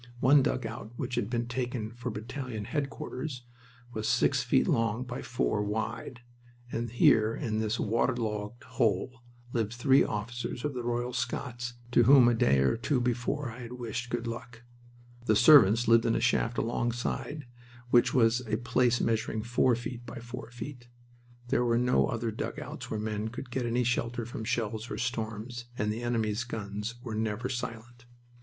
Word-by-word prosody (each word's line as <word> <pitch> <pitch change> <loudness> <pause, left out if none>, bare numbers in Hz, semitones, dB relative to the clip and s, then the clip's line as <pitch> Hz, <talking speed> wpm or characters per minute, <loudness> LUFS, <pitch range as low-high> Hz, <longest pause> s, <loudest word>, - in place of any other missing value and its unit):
One 140 +3 +6
dugout 130 -4 -3
which 125 - -4
had 105 - -1
been 120 -1 -1
taken 120 -3 -3
for 120 +1 -5
battalion 115 0 -5
headquarters 140 -1 -4 0.5
was 110 0 -2
six - - +3
feet - - +2
long 115 +1 +1
by 125 +1 -6
four 115 -3 0
wide, 110 +3 -3 0.5
and 115 +1 -2
here 110 -1 +4
in 110 -6 -2
this 110 +1 -1
waterlogged 115 0 -1
hole 120 0 0 0.3
lived 115 -2 0
three 135 +3 +4
officers 120 +4 -4
of 150 - -1
the 125 - -3
Royal 120 +1 -2
Scots 125 -1 -3 0.2
to 120 -1 +5
whom 130 -1 +8
a 120 - +4
day 70 - +3
or 65 - +2
two 120 +4 0
before 125 +2 -1
I 120 - -10
had 120 0 -7
wished 120 0 -4
"good 120 -1 -2
luck." 115 0 -7 0.6
The 110 - +4
servants 120 -3 +7
lived 115 +1 +5
in 115 - +3
the - - +1
shaft 120 -1 +1
alongside 120 +5 -2 0.5
which 120 - +5
was 120 -1 +3
a 110 0 0
place 125 0 +2
measuring 110 -1 0
four 120 +1 +3
feet 120 +1 -6
by - - -7
four 120 +1 -8
feet. 120 +1 -8 0.6
There 125 -1 +2
were 115 -1 +2
no 125 +1 +3
other 115 -2 -2
dugouts 110 - -6
where 110 - -2
men 105 0 -2
could 120 +2 -7
get 125 -1 -1
any 120 +2 +1
shelter 120 -1 -1
from 115 -1 -6
shells 115 -1 -2
or - - -4
storms, 120 0 -3
and 105 0 0
the 115 - -5
enemy's 115 -2 0
guns 105 -1 -5
were 115 -4 -5
never 110 +2 -1
silent. 120 -1 -6
120 Hz, 170 wpm, -30 LUFS, 110-125 Hz, 0.6 s, whom